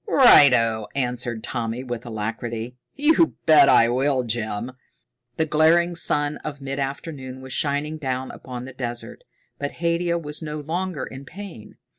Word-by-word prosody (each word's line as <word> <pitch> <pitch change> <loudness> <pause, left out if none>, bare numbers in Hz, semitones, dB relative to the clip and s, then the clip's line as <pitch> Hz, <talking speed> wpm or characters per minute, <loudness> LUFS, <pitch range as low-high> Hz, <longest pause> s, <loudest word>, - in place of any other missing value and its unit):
"Righto!" 125 - +6
answered 125 -3 -2
Tommy 120 0 -3
with 120 -2 -6
alacrity. 115 +2 -4 0.2
"You 315 +3 +3
bet 155 -2 +7
I 115 - +6
will, 130 +2 +1
Jim." 115 0 -3 0.7
The 160 - +2
glaring 160 +3 +3
sun 145 -3 +1
of 145 -2 -7
mid 135 0 -5
afternoon 135 -1 -5
was 130 0 -8
shining 150 +2 -1
down 130 -2 -3
upon 125 -1 -8
the 135 - -9
desert, 120 - -5 0.4
but 145 0 -3
Haidia 170 0 0
was 150 -2 -5
no 150 -1 -5
longer 165 0 -3
in 135 +1 -9
pain. 170 - -10
135 Hz, 145 wpm, -23 LUFS, 120-155 Hz, 0.7 s, bet